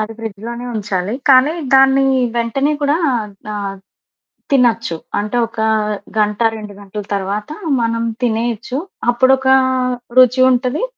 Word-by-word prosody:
అది 215 +1 -3
ఫ్రిడ్జ్‌లో‌నే 230 +3 -6
ఉంచాలి. 200 0 -2 0.2
కానీ 265 +4 +6 0.2
దాన్ని 270 0 +5 0.3
వెంటనే 255 +5 0
కూడా 285 +2 +2 0.2
ఆద్ 210 -3 -4 0.2
ఆద్ 195 -1 -5 0.7
తినొచ్చు. 230 -8 +2 0.2
అంటే 210 +4 -2
ఒక 225 - -11 0.6
గంట, 210 -1 +1 0.2
2 210 -1 -9
గంటల 205 +1 -7
తర్వాత 200 +5 -3 0.3
మనం 230 0 -1 0.2
తినేయొచ్చు. 235 +2 -1 0.3
అప్పుడొకా 265 +2 +3 0.6
రుచి 255 0 +6
ఉంటది, 250 - 0
230 Hz, 115 wpm, -17 LUFS, 210-255 Hz, 0.7 s, కానీ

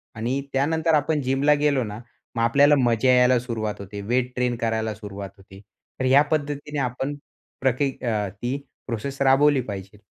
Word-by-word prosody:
आणि 120 +5 -2
त्यानंतर 160 +4 +1
आपण 150 +1 +1
जिमला 135 +3 +2
गेलो 140 -3 +2
ना, 105 0 -6 0.4
मग 115 - 0
आपल्याला 140 +5 +5
मजा 120 +1 +2
यायला 125 0 +5
सुरुवात 115 -3 -4
होते 100 +1 -7
वेट 125 +4 -1
ट्रेन 125 -1 0
करायला 110 -1 -1
सुरुवात 100 -2 -8
होते. 95 +1 -15 0.4
तर 130 - -1
या 135 +2 +6
पद्धतीने 150 -1 -2
आपण 135 +2 -2 0.5
प्रकी 135 +1 +1
अ, 105 -3 0 0.2
ही 125 +3 -1 0.3
प्रोसेस 135 +4 -4
राबवली 140 0 +4
पाहिजे. 100 -2 -8
125 Hz, 160 wpm, -24 LUFS, 110-140 Hz, 0.5 s, या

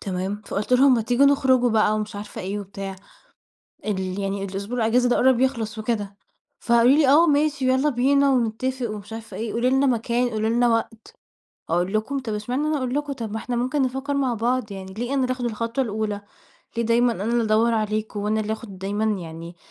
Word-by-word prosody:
تمام 195 +1 -3
فقُلت 205 +5 -3
لهُم: 260 +1 +6
"ما 230 - +1
تيجوا 245 +4 +3
نخرج 265 -2 +4
بقى 215 -1 +3
ومش 215 -1 -4
عارفة 205 +1 -7
إيه 195 +3 -3
و - - -5
بتاع، 195 0 -7 0.9
ال 190 -2 -2
يعني 195 0 -2
الأسبوع 200 +5 -5
الإجازة 240 +2 +2
ده 245 - +3
قرب 260 -1 +4
يخلص 230 -5 -1
وكده" 210 -3 -3 0.4
فقالوا 235 +1 +4
لي: 300 -3 +4
"آه 310 +6 +6
ماشي 290 -3 +2
ويالّا 260 +3 +3
بينا 280 +2 +3
ونتفق 250 +1 -1
ومش 210 +1 -8
عارفة 225 0 -8
إيه 225 -1 -4
قولي 235 +2 +1
لنا 265 +2 +3
مكان 240 0 +1
قولي 220 -1 -1
لنا 240 +1 +3
وقت" 225 -1 -2 0.6
أقول 175 +3 0
لكم 220 +6 -1
طَب 235 -5 -4
اشمعنى 245 +7 -2
أنا 305 0 +1
أقول 255 -1 -2
لكم 290 0 -2
طَب 230 -5 -5
ما - - -3
إحنا 245 +2 -4
ممكن 255 +4 0
نفكر 265 +2 -2
مع 265 -3 +1
بعض، 235 -1 -1
يعني 190 -1 -8
ليه 240 +5 -3
أنا 270 - +1
اللي 255 0 0
آخد 250 -1 -4
الخطوة 230 +3 -1
الأولى، 215 -2 -3 0.6
ليه 235 - +1
دايمًا 235 +1 +3
أنا 200 -3 -5
اللي 235 +1 +1
أدوّر 220 +2 +3
عليكم 215 -1 -2
وأنا 215 +1 0
اللي 215 0 -2
آخد 215 -4 -8
دايمًا 200 +3 -2 0.2
يعني 165 +1 -9
230 Hz, 205 wpm, -23 LUFS, 210-255 Hz, 0.9 s, لهُم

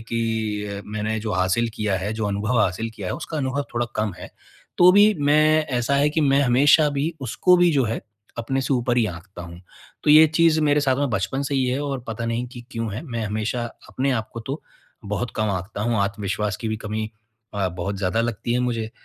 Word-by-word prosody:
कि 110 -3 -2
मैंने 110 +1 -2
जो 110 0 -3
हासिल 95 +6 +1
किया 105 -2 -1
है, 100 +3 -3
जो 110 -1 -2
अनुभव 105 +4 0
हासिल 105 +4 0
किया 100 -4 -6
है - - -2
उसका 160 -1 -6
अनुभव 135 +1 -1
थोड़ा 120 0 0
कम 105 -3 0
है। - - -9 0.5
तो 180 +1 +8
भी 210 +2 +6
मैं 155 +2 +4
ऐसा 120 +3 0
है 145 +1 +3
कि 160 - 0
मैं 140 -2 +3
हमेशा 140 +4 +5
भी 145 +4 -1
उसको 180 +8 +3
भी 175 -1 +4
जो 135 -3 +2
है 115 +1 -2 0.4
अपने 135 +3 -1
से 135 +1 0
ऊपर 120 0 0
ही 115 -3 +3
आँकता 90 +1 -8
हूँ। 85 0 -10 0.4
तो 150 - +4
ये 155 +1 +9
चीज़ 160 0 +3
मेरे 150 -1 +3
साथ 130 -2 +2
में 140 -2 0
बचपन 120 +8 -1
से 140 0 -2
ही 130 -1 +2
है 130 +3 -1
और 140 -2 -3
पता 115 +1 -4
नहीं 115 +2 -2
कि 120 0 -10
क्यों 115 -4 -3
है, 115 - -5
मैं 115 -7 -4
हमेशा 110 +3 -2 0.2
अपने 135 +1 -1
आप 110 -3 -2
को 115 - -5
तो 135 +7 -5 0.4
बहुत 105 +4 -3
कम 110 -1 0
आँकता 95 +2 -4
हूँ, 120 +1 0
आत्मविश्वास 100 0 -2
की 110 - -4
भी 110 - -2
कमी 110 0 -4 0.4
अ, 100 -2 0
बहुत 90 +3 -4
ज़्यादा 95 +3 0
लगती 120 0 -2
है 125 - +1
मुझे। 115 -3 -2
115 Hz, 225 wpm, -23 LUFS, 105-140 Hz, 0.5 s, ये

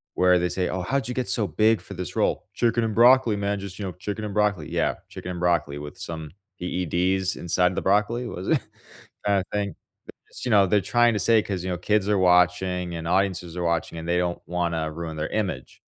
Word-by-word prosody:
where 90 0 +4
they 90 0 0
say, 90 -1 -1
"Oh, 90 - -2
how'd 130 +6 -1
you 125 - -3
get 125 -4 -2
so 105 +2 +1
big 110 +7 +3
for 90 - -11
this 90 -3 -6
role?" - - 0
"Chicken 120 0 +2
and 110 -2 -2
broccoli, 120 -1 +6
man. 100 0 -1
Just, 100 -1 -8
you 100 - -4
know, 95 - -3
chicken 105 +4 -5
and 105 - -5
broccoli." 100 -7 +1
Yeah, 85 -1 +1
chicken 90 - -8
and 90 - -5
broccoli 85 -5 +1
with 75 +5 -8
some 80 -5 -6 0.3
EEDs 90 +1 0
inside 90 +1 +1
the - - -1
broccoli 105 +5 +1
was 95 -4 -6
it - - +3 0.7
kind 100 -1 +3
of - - -9
thing. 100 -1 -2 0.3
Because, - - -11
you 125 - -1
know, 100 -2 +5
they're 105 +2 +3
trying 120 +5 +3
to 105 - -1
say 110 +3 +4
'cause, 95 -4 -4
you 95 - -3
know, 90 - -2
kids 105 +2 +1
are 105 - +3
watching, 90 0 +2
and 80 0 -5
audiences 90 -2 0
are 90 - -2
watching, 85 -1 -1
and 80 - -6
they 85 +1 +1
don't 90 0 -1
wanna 85 -2 -1
ruin 80 0 -6
their 75 +1 -2
image. 95 -12 -3
90 Hz, 230 wpm, -25 LUFS, 85-105 Hz, 0.7 s, broccoli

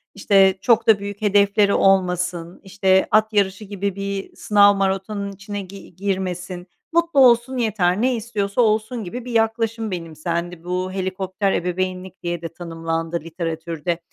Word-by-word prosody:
işte, 195 -1 +4
çok 230 +2 +3
da 215 -3 +6
büyük 200 +1 -7
hedefleri 200 0 +3
olmasın, 180 -2 +1
işte, 190 0 +2
at 215 +1 +3
yarışı 200 0 0
gibi 200 -1 -3
bir 200 0 -5
sınav 205 -1 +4
maratonunun 195 +1 -2
içine 200 +1 -6
gi 195 -2 -12
girmesin, 185 -2 -3 0.3
mutlu 335 -4 +2
olsun 250 0 +5
yeter, 205 -5 +1
ne 255 0 +2
istiyorsa 215 -1 -1
olsun." 220 +1 0
gibi 235 +7 -7
bir 250 - -6
yaklaşım 225 -1 0
benimsendi. 170 0 -4
Bu 180 +1 -2
helikopter 190 +1 -2
ebeveynlik 185 +1 -3
diye 175 -1 -3
de 165 - -4
tanımlandı 165 0 -3
literatürde. 165 0 -4
195 Hz, 140 wpm, -21 LUFS, 180-210 Hz, 0.3 s, da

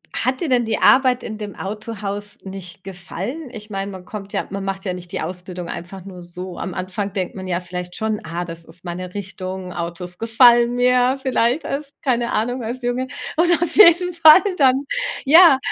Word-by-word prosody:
hat 255 +3 -1
dir 320 - -1
denn 245 -2 +2
die 225 - -1
Arbeit 255 -2 +5
in 215 -1 -6
dem 210 -2 -7
Autohaus 205 0 -5
nicht 190 -1 -9
gefallen? 195 - -6
Ich 215 -2 -10
meine, 195 0 -4
man 185 -1 -10
kommt 200 -2 -8
ja - - -2
man 195 0 -5
macht 195 +1 -4
ja 180 - -1
nicht 180 -1 -9
die - - -3
Ausbildung 180 +1 -6
einfach 180 +2 -7
nur 180 -2 -10
so. 180 +1 -8
Am 185 - -4
Anfang 190 +2 -4
denkt 185 -2 -3
man 190 -1 -7
ja 175 -1 0
vielleicht 180 0 -7
schon: 220 -1 -2
„Ah, 170 +2 -3
das 165 -1 -9
ist 175 +3 -11
meine 180 +1 -6
Richtung, 190 -2 -6
Autos 175 +1 -6
gefallen 235 +1 +5
mir“, 250 +1 +3
vielleicht 255 +2 +1
als 280 +1 -4
keine 240 -3 0
Ahnung 245 +3 -1
als 245 +3 -5
Junge. 245 +2 -1 0.3
Oder 345 +1 +4
auf 340 -2 -1
jeden 360 -2 +6
Fall 325 +1 +8 0.2
dann, 270 -1 +4 0.4
ja, 320 0 +8
205 Hz, 195 wpm, -20 LUFS, 180-250 Hz, 0.4 s, Fall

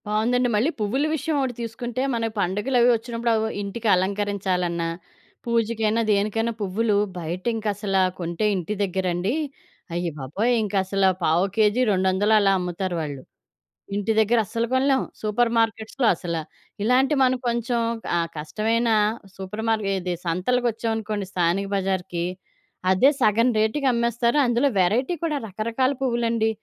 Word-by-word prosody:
బావుందండి. 240 +4 +1
మళ్ళీ 230 +9 +2
పువ్వుల 235 +8 0
విషయం 315 +1 -2
ఒకటి 260 -2 -1
తీసుకుంటే 240 +2 -4
మనకు 225 -1 -1
పండుగలవి 235 +7 +2
వచ్చినప్పుడు 235 0 -1
అవి, 220 0 0
ఇంటికి 210 +3 -4
అలంకరించాలన్నా, 185 -3 -1 0.6
పూజకైనా, 230 -1 +1
దేనికైనా, 215 +3 +1
పువ్వులు 205 +2 +1 0.2
బయటింకసలా 195 +3 -1 0.2
కొంటే 170 +4 -2
ఇంటి 185 +2 -3
దగ్గరండి 185 +1 -1 0.6
అయ్య 175 0 -1
బాబోయ్! 185 - -1
ఇంకసలా 195 -1 +1
పావు 165 +4 +3
కేజీ 215 +2 +3
200 190 +2 +2
అలా 200 -1 +3
అమ్ముతారు 180 0 -3
వాళ్ళు. 145 -3 -5 0.7
ఇంటి 205 +2 0
దగ్గర 220 +2 +3
అస్సలు 230 +4 -2
కొనలేం. 265 +1 +3 0.2
సూపర్ 230 +2 +1
మార్కెట్స్‌లో 225 +3 0
అసలా. 170 -1 -3 0.4
ఇలాంటి 255 +6 +3
మనం 255 0 +3
కొంచెం 235 0 0 0.4
ఆహ్, 165 -1 -1
కష్టమైన 220 +10 0 0.5
సూపర్ 195 +3 -6
మార్కెట్ 210 -3 +1
ఇది 180 0 -2
సంతలకొచ్చామనుకోండి 220 +2 -1
స్థానిక 180 +2 +1
బజార్‌కి, 185 -3 -1 0.7
అదే 190 +9 +5
సగం 230 +2 +4
రేటుకి 245 +6 +1
అమ్మేస్తారు. 235 +2 +1
అందులో 240 +3 +2
వెరైటీ 235 - +2
కూడా, 305 -3 0
రకరకాల 225 +6 0
పువ్వులండి. 235 -3 +1
215 Hz, 125 wpm, -24 LUFS, 190-235 Hz, 0.7 s, అదే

